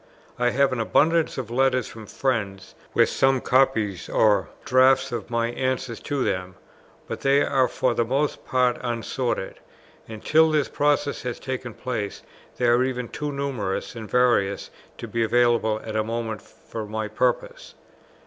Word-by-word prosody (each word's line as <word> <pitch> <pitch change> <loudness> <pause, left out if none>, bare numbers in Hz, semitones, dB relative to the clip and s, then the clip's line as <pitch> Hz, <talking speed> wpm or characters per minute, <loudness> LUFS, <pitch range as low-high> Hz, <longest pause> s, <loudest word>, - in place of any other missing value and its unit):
I 125 0 +3
have 135 +2 +2
an 125 - -2
abundance 160 +8 +2
of 120 -4 -5
letters 130 0 +2
from 110 -2 -11
friends 100 -8 -2 0.2
with - - +5
some 135 0 +2
copies 120 -8 +1
or 105 -3 +3 0.2
drafts 130 0 +4
of 115 -2 -5
my 115 0 0
answers 130 -1 -2
to 145 -3 -2
them, 90 0 -2 0.5
but - - -5
they 140 +1 +4
are 130 -2 +2
for 125 +1 0
the 120 - +1
most 135 +5 -1
part 125 -1 +1
unsorted; 120 -2 -3 0.5
and, 110 -1 -10
till 160 +1 +5
this 150 -3 +1
process 145 0 0
has 125 -2 -4
taken 130 -3 -5
place, 110 -6 -4 0.3
they 125 - 0
are 120 +1 +4
even 125 -2 -3
too 150 -1 -4
numerous 135 -9 -3
and 110 -2 -8
various 120 -6 +2 0.3
to - - -7
be 115 - -2
available 115 -2 +2
at 110 -1 -5
a 110 - +1
moment 115 -1 -4
for 110 -2 -9
my 110 0 -3
purpose. - - -2
125 Hz, 160 wpm, -24 LUFS, 110-135 Hz, 0.5 s, with